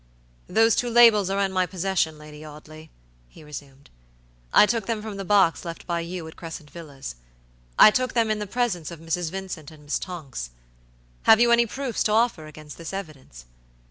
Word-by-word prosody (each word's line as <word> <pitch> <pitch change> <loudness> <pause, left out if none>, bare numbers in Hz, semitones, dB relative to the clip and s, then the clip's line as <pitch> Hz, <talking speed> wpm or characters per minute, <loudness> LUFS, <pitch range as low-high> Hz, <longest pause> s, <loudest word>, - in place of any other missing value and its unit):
"Those 225 -1 +3
two 245 - 0
labels 230 -5 +6
are 195 +1 -1
in 195 -1 0
my 185 -1 +1
possession, 185 -4 -1
Lady 150 0 -12
Audley," 155 +1 -12 0.4
he 155 - -16
resumed. 140 -2 -11 0.6
"I - - +7
took 225 -2 -2
them 230 -2 -1
from 215 -2 -6
the 195 - -4
box 195 -4 +3
left 170 -1 -7
by 170 -1 -1
you 170 0 -6
at 160 - -11
Crescent 160 -3 -9
Villas. 145 - -9 0.6
I 215 - +9
took 255 +3 -1
them 225 -2 +2
in 215 - -1
the 210 - -4
presence 195 -8 -1
of 170 -2 -9
Mrs. 165 +1 -2
Vincent 185 -4 -7
and 155 -2 -16
Miss 145 - -2
Tonks. 145 - -7 0.8
Have 220 - +8
you 240 0 +4
any 235 0 +4
proofs 265 0 -4
to 210 - +2
offer 220 -9 +1
against 155 0 -12
this 165 +2 -7
evidence? 145 - -9
175 Hz, 190 wpm, -24 LUFS, 155-215 Hz, 0.8 s, I